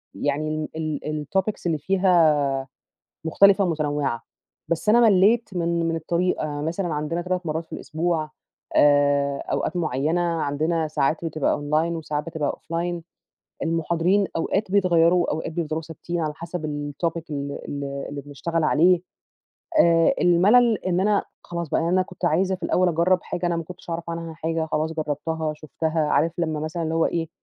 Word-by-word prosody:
يعني 155 +2 -2
ال 155 -1 -3
الtopics 195 +2 0
اللي 165 -2 +1
فيها 155 -6 +2 0.6
مختلفة 200 +4 +5
ومتنوِّعة، 145 -7 -1 0.4
بس 170 +5 -1
أنا 235 - +6
ملِّيت 215 +2 +4
من 170 -1 0
من 165 - -1
الطريقة، 170 +1 0
يعني 145 0 -4
مثلًا 175 +3 -2
عندنا 155 +3 -2
3 180 0 -2
مرَّات 160 +1 -2
في - - -13
الأسبوع 160 -1 -2 0.4
آآ، 145 -1 +4
أوقات - - -1
مُعينة 155 +1 0
عندنا 160 -1 0
ساعات 155 +2 0
بتبقى 155 -3 0
أونلاين 155 +3 0
وساعات 150 -2 -3
بتبقى 160 -4 -2
أوفلاين 170 +1 -3 0.6
المُحاضرين 170 +4 +1
أوقات 190 +4 -1
بيتغيَّروا 175 -3 +4
وأوقات 160 +1 -3
بيفضَلوا 160 -1 -2
ثابتين، 170 +2 -5
على 155 -1 -2
حسب 170 0 -5 0.3
الtopic 165 +3 -2
ال 140 -1 -3 0.2
ال 140 0 -4 0.3
اللي 145 -1 -6
بنشتغل 145 +4 -3
عليه. 170 +4 +4 0.8
آآ 165 -1 +5
الملل 210 +6 +5
إن 180 -1 +1
أنا 205 +1 +2 0.2
خلاص 170 -2 -5
بقى، - - +1
يعني 165 +1 0
أنا 185 - +4
كنت 185 -1 -9
عايزة 185 +3 +2
في - - -10
الأوّل 185 0 +2
أجرَّب 175 +2 +3
حاجة 175 0 -3
أنا 170 -1 0
ما 165 - -2
كُنتش 175 0 -11
أعرف 165 0 -4
عنها 165 -1 -5
حاجة، 160 0 -2
خلاص 155 +1 -1
جرَّبتها، 155 0 -2
شُفتها، 160 +1 -3
عارف، 165 +2 +2
لمّا 160 -3 -1
مثلًا، 155 +2 -3
اللي 160 0 -2
هو 165 - +3
إيه، 165 -1 -2
165 Hz, 160 wpm, -24 LUFS, 155-175 Hz, 0.8 s, أنا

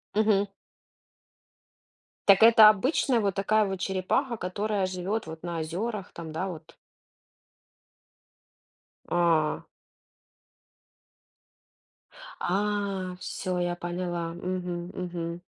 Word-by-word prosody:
Мгм. 210 -2 +3 1.8
Так 200 +2 +6
это 225 -2 +9
обычная 250 +3 +2
вот 200 -2 0
такая 215 +2 +2
вот 190 -1 -4
черепаха, 195 +7 -1
которая 200 +1 -1
живет 185 +4 -3
вот 160 0 -8
на 170 -1 -3
озерах 190 +6 -4
там, 165 -2 -8
да, 180 +5 -3
вот? 165 -2 -9 2.3
А. 165 -3 +2 2.7
А, 195 -1 -1
всё, 185 -2 -3
я 175 0 -1
поняла. 175 -1 -3
Мгм. 180 0 -4
Мгм. 170 -1 -5
185 Hz, 90 wpm, -27 LUFS, 175-205 Hz, 2.7 s, это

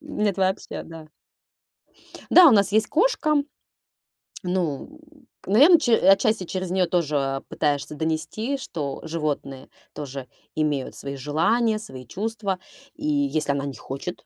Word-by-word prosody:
Нет, 210 -10 -2
вообще, 190 0 -1
да. 165 -1 -11 1.2
Да, 360 -1 +9
у 275 - +8
нас 200 -2 +4
есть 220 +1 +3
кошка. 310 - +2 1.0
Ну, 180 - -3 0.5
наверно, 285 - +7
ч 240 -7 +3 0.2
отчасти 195 -1 +2
через 185 0 -4
неё 185 -1 +2
тоже, 165 -4 0
а, 135 0 -1
пытаешься 145 0 -2
донести, 160 - -2
что 145 - -5
животные 150 -4 -4 0.2
тоже 135 -3 -7 0.3
имеют 150 -4 -1
свои 140 0 -6
желания, 170 - +1
свои 135 -13 -9
чувства. 205 - -3 0.4
И - - -7
если 280 - +1
она 140 0 -2
не 140 - -5
хочет, 135 +10 -7
180 Hz, 130 wpm, -24 LUFS, 145-220 Hz, 1.2 s, Да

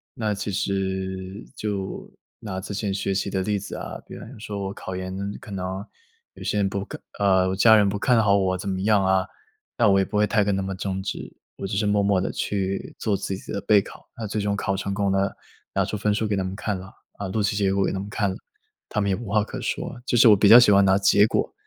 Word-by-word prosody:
那 110 -2 -1
其 100 +1 -4
实， 95 0 -3
就 100 -3 -4 0.3
拿 95 -4 -5
之 100 - -6
前 100 0 -2
学 100 0 -1
习 100 +1 -1
的 95 -1 -1
例 105 +1 0
子 - - -7
啊， - - -6
比 - - -9
如 125 +5 -10
说 105 -2 -5
我 95 - -5
考 95 -2 -7
研， 95 0 -5 0.3
可 - - -12
能 95 +1 -4 0.5
有 - - -11
些 - - -1
人 100 -1 +2
不 100 0 -3
看 - - -8 0.2
呃， 95 -2 +3
我 95 - -1
家 110 +3 +7
人 105 -2 +5
不 100 +1 -3
看 125 +1 +3
好 100 -1 +4
我 95 -1 +1
怎 95 - -6
么 95 -1 -2
样 105 -1 +3
啊， 95 0 +2 0.5
那 115 - +4
我 95 0 +5
也 95 - +2
不 105 - -3
会 105 - +4
太 105 -2 +2
跟 100 -1 +1
他 95 - -1
们 95 0 -4
争 95 -1 -3
执， 95 - -6 0.2
我 95 - -4
只 100 0 -2
是 105 - +1
默 105 0 +2
默 100 -1 +3
地 95 - -2
去 95 -1 -3
做 105 -3 0
自 95 0 -3
己 - - -10
的 100 - -3
备 105 +1 +5
考。 - - -13
那 115 - -4
最 105 +1 -2
终 100 0 0
考 95 -1 -1
成 100 +1 -3
功 100 -1 0
了， 95 0 0 0.4
拿 - - +2
出 - - -4
分 105 +1 +1
数 110 +1 0
给 105 - 0
他 95 - 0
们 95 +1 -4
看 105 0 -2
了 95 - -9
啊， - - -16 0.3
啊， - - -3
录 105 +2 0
取 100 - 0
结 100 -2 +2
果 100 0 +2
给 - - 0
他 95 - -2
们 100 +1 -6
看 105 0 0
了， 95 - -4 0.5
他 - - -1
们 100 - 0
也 - - +2
无 115 +3 -8
话 105 -1 +3
可 - - -7
说。 120 - -4
就 120 - +1
是 120 - +7
我 105 - +8
比 100 0 +5
较 120 - +11
喜 120 -4 +6
欢 100 0 +6
拿 95 0 +4
结 100 +1 +5
果， - - -1
100 Hz, 295 characters per minute, -24 LUFS, 95-105 Hz, 0.5 s, 较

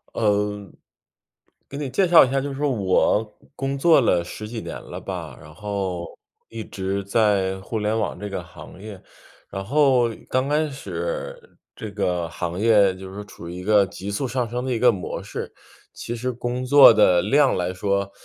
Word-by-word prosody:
呃， 105 -2 0 1.0
给 - - -9
你 145 -2 -3
介 185 +8 +2
绍 170 -1 +8
一 - - -4
下， 135 - +1
就 140 0 -4
是 140 +2 -5
我， 105 -2 +1 0.2
工 135 0 -2
作 165 +2 +5
了 90 -7 +2
10 105 +5 -8
几 115 0 -6
年 - - -7
了 - - -9
吧， - - -6
然 75 +1 -13
后 95 -5 -4 0.4
一 115 -1 -6
直 100 0 -4
在 100 -2 +1
互 110 +4 -4
联 105 +1 0
网 110 - -2
这 105 +1 -5
个 95 -3 -5
行 85 - -13
业。 105 -3 -9 0.5
然 95 - -5
后 130 -1 +3 0.2
刚 130 +1 0
开 150 +1 +1
始 - - -6 0.2
这 110 - -7
个 90 -4 -1
行 85 +2 -4
业 105 -4 +4
就 95 0 -10
是 105 +1 -7
处 85 -4 -11
于 85 - -7
一 90 - -7
个 105 0 +4
急 95 +2 -7
速 130 +7 -2
上 125 0 -1
升 125 +2 -3
的 130 - -2
一 - - 0
个 125 0 +6
模 95 -5 -5
式， - - -6 0.4
其 120 - -6
实 125 +2 -2
工 120 +1 -4
作 140 -2 +8
的 95 -5 +4
量 140 +6 +3
来 90 0 -2
说， 100 +1 -1
105 Hz, 200 characters per minute, -23 LUFS, 95-130 Hz, 1.0 s, 绍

